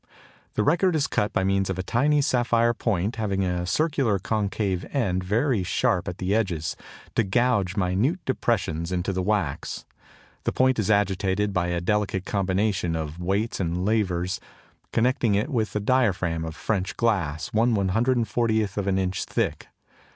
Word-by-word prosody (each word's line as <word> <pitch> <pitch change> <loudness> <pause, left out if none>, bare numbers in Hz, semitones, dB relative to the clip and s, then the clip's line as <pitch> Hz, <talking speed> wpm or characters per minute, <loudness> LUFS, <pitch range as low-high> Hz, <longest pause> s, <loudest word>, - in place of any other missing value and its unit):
The 105 - +2
record 170 - +3
is 150 - +2
cut 105 - 0
by - - 0
means 95 0 +1
of 95 - -2
a 95 - -2
tiny 145 +9 +2
sapphire 120 -3 +2
point 105 -1 -1
having 100 -3 0
a 90 -1 -1
circular 140 - +1
concave 100 -2 -1
end 95 -10 0
very 115 +4 +1
sharp 90 0 0
at 90 - -4
the 95 +1 -1
edges, 90 -8 -1 0.4
to 115 - +2
gouge 105 -3 +1
minute 100 - +1
depressions 90 -10 -1
into 90 +2 -1
the 95 - -1
wax. 100 -7 -2 0.6
The - - 0
point 130 -2 +2
is 110 - 0
agitated 100 0 +1
by 90 -2 +1
a 85 0 -1
delicate 95 0 0
combination 95 -2 0
of 80 +1 -4
weights 100 +6 -1
and 90 0 -1
levers 95 -4 0 0.5
connecting 120 -2 +2
it 105 +8 0
with 110 -5 -1
a - - +2
diaphragm 100 -8 +1
of 80 -1 -6
French 95 -4 -2
glass 85 -10 0
1/140 110 -2 +1
inch 95 0 -1
thick. - - -2
100 Hz, 150 wpm, -25 LUFS, 90-115 Hz, 0.6 s, record